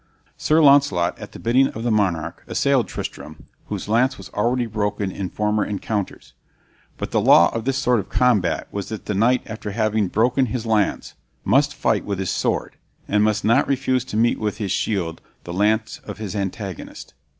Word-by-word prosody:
Sir 155 +1 +2
Launcelot, 135 -12 +4
at - - -9
the - - -10
bidding 130 +4 +3
of 110 - -7
the 120 - 0
monarch, 85 -6 0
assailed 135 -6 +1
Tristram, 75 -3 -7 0.2
whose - - -5
lance 125 +5 +2
was 95 - -10
already 120 +4 0
broken 105 -3 -2
in 95 -1 -4
former 105 0 0
encounters. 105 0 -4 0.6
But - - -5
the - - +2
law 85 - +6
of 115 0 -3
this 135 0 0
sort 125 -3 +2
of 100 - -6
combat 110 -9 +1
was 100 -2 -5
that 110 - -6
the 105 - -2
knight 120 +5 +2
after 110 -1 -6
having 110 -1 0
broken 125 +7 +2
his 120 +1 -4
lance 110 -3 0 0.3
must - - +3
fight - - +1
with 100 -2 -3
his 95 -2 -2
sword, - - -2 0.3
and 105 +1 +2
must 105 -1 +1
not 115 +6 +3
refuse 130 -2 0
to 105 - -4
meet 115 +1 +2
with 105 -1 -2
his 100 -5 -3
shield 90 -6 -1 0.2
the 85 - -7
lance 105 +4 +1
of 105 -2 -8
his 105 -1 -5
antagonist. 100 -2 -5
110 Hz, 185 wpm, -22 LUFS, 100-120 Hz, 0.6 s, law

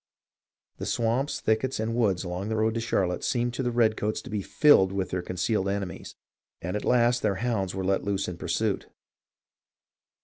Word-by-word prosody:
The - - -5
swamps, 120 +5 0
thickets, 110 +4 0
and 110 +1 -1
woods 105 -7 +1
along 90 +3 -4
the 110 - -1
road 110 0 +1
to 115 - -1
Charlotte 95 -6 0
seemed 120 -2 0
to 125 - -2
the 125 - 0
redcoats 110 -3 +1
to - - -9
be 105 -1 -1
filled 95 -5 +5
with 95 -2 -2
their 90 - -1
concealed 95 +3 -1
enemies, 100 -3 -4 0.4
and 90 +4 -4
at 105 - -2
last 120 0 +3
their 105 -3 +1
hounds 100 -3 -1
were 95 -1 -2
let 95 0 +1
loose 100 -1 -1
in 90 - -5
pursuit. - - -1
105 Hz, 180 wpm, -27 LUFS, 95-120 Hz, 0.4 s, filled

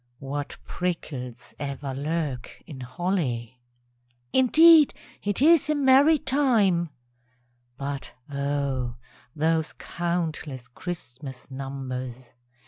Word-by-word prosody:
(What 140 +2 -5
prickles 135 -9 -4
ever 140 -1 -4
lurk 145 -2 -3
in 145 -5 -9
holly!) 125 - -2 0.7
Indeed 310 +4 +7 0.3
it 205 +6 0
is 320 -1 +6
a 305 - +3
merry 285 +3 +6
time; 225 - +2 0.9
(_But 140 0 -4 0.2
O! 140 -3 -1 0.4
those 160 +1 +1
countless 160 -7 -3
Christmas 130 -2 -8
numbers! 130 -2 -5
145 Hz, 85 wpm, -26 LUFS, 130-185 Hz, 0.9 s, Indeed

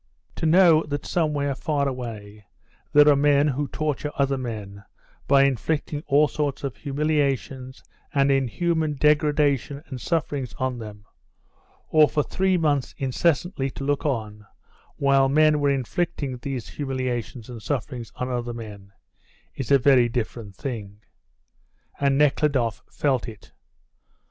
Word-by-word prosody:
To 160 - 0
know 165 -1 +6
that 145 0 -4
somewhere 150 -4 0
far 145 0 -1
away 110 -5 -7 0.5
there 150 0 +6
are 145 - +7
men 145 +1 +3
who 145 +1 -2
torture 150 0 -2
other 140 -1 +1
men 105 -6 -6 0.4
by 140 0 +5
inflicting 145 +3 -1
all 145 +1 +4
sorts 145 -1 -3
of 135 -3 -3
humiliations 140 -3 -2 0.3
and 140 0 +3
inhuman 155 +4 0
degradation 145 -1 +2
and 130 -4 -8
sufferings 145 -6 -2
on 130 -2 -2
them, 105 -2 -10 0.8
or 155 -1 +5
for 150 - +1
three 190 +3 +1
months 145 -5 0
incessantly 140 +2 0
to 135 - -8
look 145 0 0
on 105 -7 -3 0.5
while 135 -1 +3
men 155 +1 +4
were 145 -1 +2
inflicting 140 0 -2
these 125 -1 -5
humiliations 130 -4 -4
and 120 -3 -9
sufferings 125 -3 -4
on 125 - -3
other 120 -1 -3
men 100 -4 -10 0.6
is 135 - -5
a 140 - +6
very 130 -2 +4
different 115 -4 -4
thing. 105 -6 -6 1.0
And 140 -1 +2
Nekhludoff 140 -6 +2
felt 135 -5 0
it. 110 -3 -11
140 Hz, 135 wpm, -24 LUFS, 120-150 Hz, 1.0 s, are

